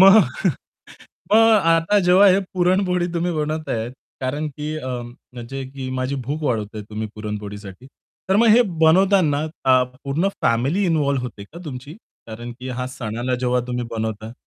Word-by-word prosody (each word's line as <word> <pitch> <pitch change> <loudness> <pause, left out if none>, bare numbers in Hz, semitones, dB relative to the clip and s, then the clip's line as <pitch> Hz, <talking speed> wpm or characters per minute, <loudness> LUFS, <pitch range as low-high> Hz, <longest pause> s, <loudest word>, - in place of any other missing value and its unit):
मग 195 +3 +9 1.1
मग - - +7 0.3
आता 165 +5 +3
जेव्हा 185 +3 +6
हे 190 0 +5 0.2
पुरणपोळी 180 0 +2
तुम्ही 175 +1 0
बनवताहेत 150 -7 -2 0.3
कारण 140 +4 -2
की 150 +1 -4
अ, 130 - -6 0.5
म्हणजे 130 +3 -6
की 135 -1 -5
माझी 130 +2 -1
भूक 150 +3 -3
वाढवताहेत 110 -5 -2
तुम्ही 110 +1 -4
पुरणपोळीसाठी. 105 0 -7 0.4
तर 190 - +3
मग 230 +3 +4
हे 245 - +7 0.2
बनवताना 165 -3 +4 0.2
अ, 130 -1 +5 0.2
पूर्ण 150 +8 0
फॅमिली 135 - +2
इन्व्हॉल्व 145 -5 +1
होते 115 -5 -7
का 160 +11 -13
तुमची? 140 0 -8 0.3
कारण 120 +2 -7
की 130 - -6
ह्या 125 0 -3
सणाला 120 +2 -2
जेव्हा 125 0 +1
तुम्ही 125 0 -2
बनवताय 110 -1 -4
135 Hz, 150 wpm, -21 LUFS, 120-165 Hz, 1.1 s, मग